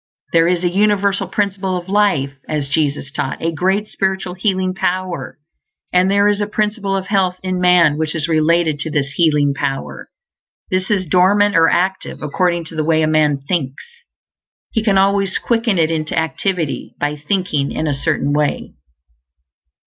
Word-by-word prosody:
There 165 0 +4
is 180 0 0
a - - +3
Universal 200 0 +1
Principle 195 -1 -1
of 175 0 -7
Life, 195 -9 +1 0.2
as 150 -3 -2
Jesus 145 -1 -1
taught; 135 - -3
a 165 - -1
great 190 +5 0
spiritual 190 -3 -2
Healing 185 0 -1
Power; 185 -6 -3 0.6
and 180 +1 +3
there 200 +1 +3
is 205 0 +1
a 205 - -1
Principle 210 -1 -1
of 190 - -4
Health 190 -3 +1
in 185 -1 -2
man 170 -4 +4
which 160 0 -1
is 160 -1 -1
related 160 -1 +2
to 160 - -4
this 140 -2 -1
Healing 150 -3 +2
Power. 135 -1 -4 0.6
This 185 0 0
is 195 -3 +1
dormant 195 +4 +3
or 165 0 +5
active, 190 -1 -1
according 170 +3 0
to 165 - -10
the 155 - 0
way 160 0 +2
a - - +2
man 150 -3 +2
thinks. 140 -7 -4 0.7
He 225 - 0
can 200 -3 +2
always 195 0 +2
quicken 230 -4 0
it 160 -1 +2
into 155 -1 -2
activity 160 0 -2
by 145 0 -1
thinking 150 -2 -1
in 155 - -2
a 150 - 0
Certain 145 0 -1
Way. 150 -1 -1
180 Hz, 170 wpm, -18 LUFS, 155-195 Hz, 0.7 s, or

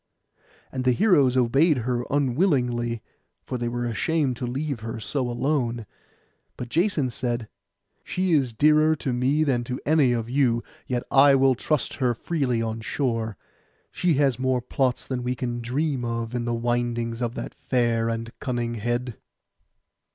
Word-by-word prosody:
And 130 -1 -3
the 125 -1 +3
heroes 145 - +4
obeyed 135 +6 +4
her 125 -1 0
unwillingly, 125 - +1 0.4
for 125 - -4
they 120 - -1
were 120 +1 -2
ashamed 135 +3 0
to 125 - -3
leave 135 +1 -3
her 115 +1 -5
so 125 +4 -2
alone; 120 -3 -1 0.7
but 125 - -6
Jason 160 - +1
said, 120 -2 -2 0.6
'She 185 0 -1
is 135 -5 +2
dearer 155 +6 +4
to 135 -3 -3
me 135 +5 +2
than 130 -5 +1
to 125 +1 -4
any 150 -4 +4
of 115 -2 -1
you, 125 -2 +1 0.2
yet 125 -1 -1
I 140 0 +7
will 135 0 +4
trust 150 +4 -1
her 125 -2 +2
freely 125 -5 -1
on 110 0 -3
shore; 115 -3 -2 0.5
she 175 -4 +1
has 135 -3 +2
more 130 -1 +1
plots 125 +1 -1
than 130 -2 -3
we 125 +1 -2
can 120 -1 -3
dream 135 +2 -1
of 115 0 -3
in 120 -1 -2
the 120 0 0
windings 120 0 -1
of 120 0 -2
that - - -5
fair 115 -2 0
and 115 0 -3
cunning 120 -3 -2
head. 120 +1 -2
125 Hz, 160 wpm, -25 LUFS, 120-140 Hz, 0.7 s, I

